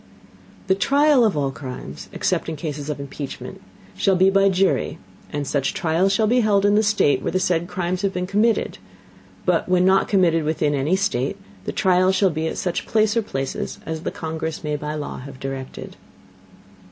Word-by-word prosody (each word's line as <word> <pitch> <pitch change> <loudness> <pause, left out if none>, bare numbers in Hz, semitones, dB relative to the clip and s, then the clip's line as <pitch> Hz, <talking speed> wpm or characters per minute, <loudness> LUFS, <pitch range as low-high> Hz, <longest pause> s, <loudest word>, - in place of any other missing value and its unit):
The 190 - +3
Trial 280 +6 +4
of 210 -9 +2
all 140 -2 0
Crimes, 130 0 -8
except - - -1
in 160 - -3
Cases 150 -1 -5
of 150 - -3
Impeachment, 140 0 -7 0.3
shall 195 - +2
be 190 +1 +4
by 195 0 +4
Jury; 190 -3 +1 0.3
and 145 -1 -3
such 140 0 -1
Trial 170 +3 +2
shall 215 +3 +2
be 245 +4 +3
held 205 -3 +3
in 205 - +4
the 210 - +5
State 205 -11 +2
where - - -2
the 185 - +2
said 175 -2 0
Crimes 180 0 -2
shall 200 - +1
have 195 - -5
been 180 0 -1
committed; 210 +4 +1 0.7
but - - +1
when 180 0 +4
not 190 +1 +4
committed 170 -5 +3
within 150 -1 0
any 145 +6 +1
State, 195 - -1 0.3
the - - -2
Trial 185 0 +3
shall 190 -1 +2
be 160 +1 -2
at - - -4
such 175 -2 -2
Place 215 0 +2
or 230 - +3
Places 135 -10 -4
as 160 -1 -4
the - - -2
Congress 160 0 -5
may 150 -1 -1
by 150 +1 -4
Law 150 -2 -5
have 135 0 -10
directed. 135 -1 -6
180 Hz, 195 wpm, -22 LUFS, 150-195 Hz, 0.7 s, the